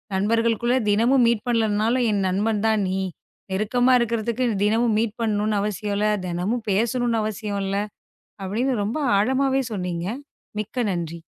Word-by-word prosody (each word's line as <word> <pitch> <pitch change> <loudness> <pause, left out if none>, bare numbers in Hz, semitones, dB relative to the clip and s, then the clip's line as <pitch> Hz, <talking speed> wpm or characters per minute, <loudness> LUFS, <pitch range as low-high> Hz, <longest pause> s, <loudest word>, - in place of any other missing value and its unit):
நண்பர்களுக்குத் 230 +3 +1
தினமும் 240 +4 +4
மீட் 235 0 0
பண்ணலைனாலும் 225 +1 +1
என் 200 -2 0
நண்பன் 205 +3 0
தான் 220 -2 +2
நீ. 190 - -1 0.5
நெருக்கமா 215 +6 +2
இருக்கிறதுக்கு 235 +1 -1 0.2
தினமும் 225 +1 +2
மீட் 225 -1 -2
பண்ணனும்னு 210 -1 0
அவசியம் 205 0 -2
இல்ல. 210 +1 +1 0.2
தினமும் 185 +7 -2
பேசணும்னு 230 +2 +1
அவசியம் 210 -1 -3
இல்ல 195 +1 -1 0.7
அப்படின்னு 235 +7 -1
ரொம்ப 225 +9 -2 0.2
ஆழமாவே 265 +5 +2
சொன்னீங்க. 180 -3 -3 0.5
மிக்க 225 +4 -3
நன்றி. 170 -2 -3
215 Hz, 135 wpm, -23 LUFS, 205-235 Hz, 0.7 s, தினமும்